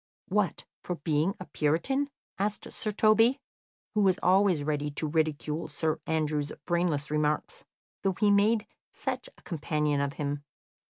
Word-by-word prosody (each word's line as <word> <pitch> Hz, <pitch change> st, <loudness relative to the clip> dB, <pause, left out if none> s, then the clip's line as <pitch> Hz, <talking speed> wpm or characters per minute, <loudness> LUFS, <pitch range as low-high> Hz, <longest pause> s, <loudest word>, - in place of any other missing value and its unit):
"What, 195 Hz, -4 st, 0 dB, 0.2 s
for 180 Hz, -, -3 dB
being 155 Hz, +4 st, 0 dB
a 185 Hz, -, -6 dB
puritan?" 170 Hz, -, 0 dB, 0.3 s
asked 205 Hz, +1 st, -2 dB
Sir 215 Hz, -, -3 dB
Toby, 225 Hz, +5 st, +4 dB, 0.5 s
who 210 Hz, -, +2 dB
was 190 Hz, -2 st, +4 dB
always 185 Hz, -4 st, +4 dB
ready 150 Hz, 0 st, -1 dB
to 145 Hz, +2 st, -3 dB
ridicule 155 Hz, 0 st, 0 dB
Sir 155 Hz, +1 st, -1 dB
Andrew's 150 Hz, -2 st, 0 dB
brainless 170 Hz, -5 st, 0 dB
remarks, 150 Hz, -, 0 dB, 0.4 s
though 195 Hz, -1 st, +1 dB
he 205 Hz, +2 st, +3 dB
made 210 Hz, +2 st, +4 dB, 0.2 s
such -, -, -4 dB
a -, -, -20 dB
companion 150 Hz, -3 st, 0 dB
of 140 Hz, 0 st, -1 dB
him. 145 Hz, -2 st, -3 dB
160 Hz, 140 wpm, -29 LUFS, 150-200 Hz, 0.5 s, Toby